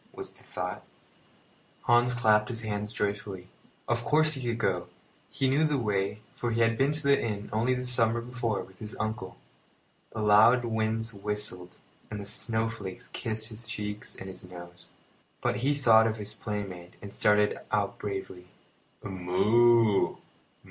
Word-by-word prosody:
was - - -7
the - - -20
thought. - - -4
The - - -14
Rescue - - -32 0.3
Hans - - +2
clapped 105 -3 +3
his 115 -2 -4
hands 105 -1 -3
joyfully. 100 -3 -3 0.4
Of 120 0 0
course 155 +3 +3
he 135 - -4
could 120 -2 -1
go. - - 0 0.4
He 135 - 0
knew 140 +4 +3
the 150 -2 +2
way, 105 -3 -1
for 120 - -2
he 115 0 0
had 115 0 +3
been 135 +5 +2
to 150 +1 -3
the 140 0 +4
inn 105 -2 -3
only 120 +4 +2
the 125 0 -3
summer 120 -2 +3
before 120 -3 -2
with 95 -1 -17
his 105 -1 -8
uncle. 110 -3 -3 0.7
The 110 - -3
loud 110 +4 +6
winds 110 0 -1
whistled, 100 -3 -4 0.3
and 105 - -5
the 100 - -6
snowflakes 110 -2 -1
kissed 110 -1 -3
his 115 +1 -10
cheeks 105 -1 -5
and 95 - -8
his 95 -1 -8
nose; 90 -1 -11 0.5
but - - 0
he 140 +6 +1
thought 115 -5 +6
of 110 0 -2
his 105 0 -3
playmate 100 -5 -5
and 100 0 -9
started 105 0 +3
out 100 -1 0
bravely. 95 -3 -5 0.6
"Moo! 105 +4 +3
110 Hz, 165 wpm, -29 LUFS, 100-120 Hz, 0.7 s, loud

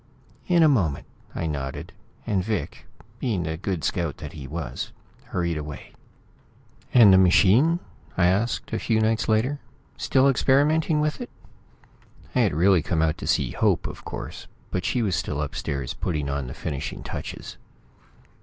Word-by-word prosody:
"In 175 -2 +5
a - - +7
moment," 95 - +1 0.3
I 80 - -2
nodded, 70 -4 -4 0.3
and 95 -3 0
Vic, 105 -1 -4 0.3
being 110 -9 -1
the 80 0 -3
good 90 -2 -3
scout 80 +1 -1
he 70 -3 -8
was, - - -5 0.3
hurried 85 -3 -2
away. 75 -1 -8 1.0
"And 110 -6 +8
the 95 - +7
machine?" 110 - +5 0.4
I 90 - +4
asked 100 +7 0
a - - 0
few 110 -2 +1
nights 110 +1 +1
later. 120 +7 +1 0.4
"Still 135 0 +3
experimenting 150 +4 +3
with 150 0 -1
it?" - - -6 1.0
I - - +1
had 105 -11 +2
really 90 +2 +4
come 80 +1 0
out 80 -1 0
to - - -6
see - - +1
Hope, - - +1
of - - -7
course, - - -7 0.2
but 90 - -2
she 125 - +1
was 95 -4 +1
still 85 -4 -2
upstairs, 70 -2 -3
putting 75 -5 -2
on 70 -2 -2
the 60 - -7
finishing 75 -1 -5
touches. - - -7
95 Hz, 155 wpm, -25 LUFS, 80-120 Hz, 1.0 s, And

